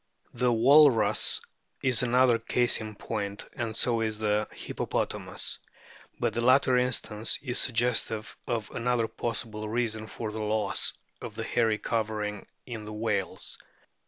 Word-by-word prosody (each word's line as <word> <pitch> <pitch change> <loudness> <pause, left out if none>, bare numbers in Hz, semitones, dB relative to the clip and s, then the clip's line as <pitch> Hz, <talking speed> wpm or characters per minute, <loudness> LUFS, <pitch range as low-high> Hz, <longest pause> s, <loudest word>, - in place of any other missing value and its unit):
The 125 -1 +2
Walrus 130 0 +5 0.4
is 130 -3 +2
another 125 -1 +4
case 120 +1 +1
in 110 -1 -7
point, 100 -1 -4
and 115 -5 -4
so 115 -1 +1
is 110 -1 -1
the 105 0 0
Hippopotamus. - - -2 0.6
But - - 0
the 120 - -1
latter 130 +1 +4
instance 115 -3 +2
is 125 -3 0
suggestive 115 -2 0
of 115 -3 -2
another 115 -1 0
possible 110 -1 -4
reason 110 -1 -1
for 110 0 -5
the 110 0 -5
loss 105 0 +1 0.3
of 110 - -7
the 115 - -4
hairy 115 -1 +1
covering 105 -3 -2 0.2
in 110 -3 -7
whales. 100 -5 -2
115 Hz, 130 wpm, -28 LUFS, 110-120 Hz, 0.6 s, Walrus